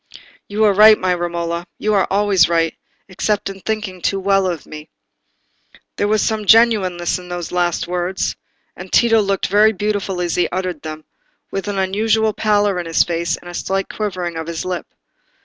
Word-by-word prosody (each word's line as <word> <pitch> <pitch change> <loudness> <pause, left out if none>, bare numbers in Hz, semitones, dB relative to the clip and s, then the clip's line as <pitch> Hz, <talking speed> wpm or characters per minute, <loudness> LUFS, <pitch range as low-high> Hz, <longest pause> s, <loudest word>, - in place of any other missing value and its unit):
"You 210 +2 -1
are 210 -2 +5
right, 215 +2 +7
my 185 -1 0
Romola; 170 -1 -3
you 215 0 0
are 195 -2 +2
always 200 -2 +3
right, 165 -1 +1 0.3
except 200 +1 -2
in 195 - -11
thinking 210 -3 -4
too 195 - 0
well 195 0 +2
of 170 -6 -4
me." 155 0 -10 1.1
There 205 - +1
was 215 0 +2
really 220 -1 0
some - - -8
genuineness 190 -7 +3
in 180 0 -12
those 175 -1 -5
last 175 -1 0
words, 180 +1 -2 0.4
and - - -10
Tito 225 -2 +4
looked 195 -1 -1
very 215 +2 +4
beautiful 205 -2 -2
as 175 -2 -1
he 180 - +1
uttered 180 -4 -3
them, 155 0 -8 0.5
with 195 +1 -4
an 205 -1 -3
unusual 215 +3 +1
pallor 205 -3 +1
in 175 - -5
his 165 - +3
face, 170 0 -2
and - - -15
a 175 - -8
slight 195 +2 -2
quivering 180 -5 -4
of 160 0 -5
his 170 0 -4
lip. 180 -3 -4
190 Hz, 185 wpm, -18 LUFS, 175-210 Hz, 1.1 s, right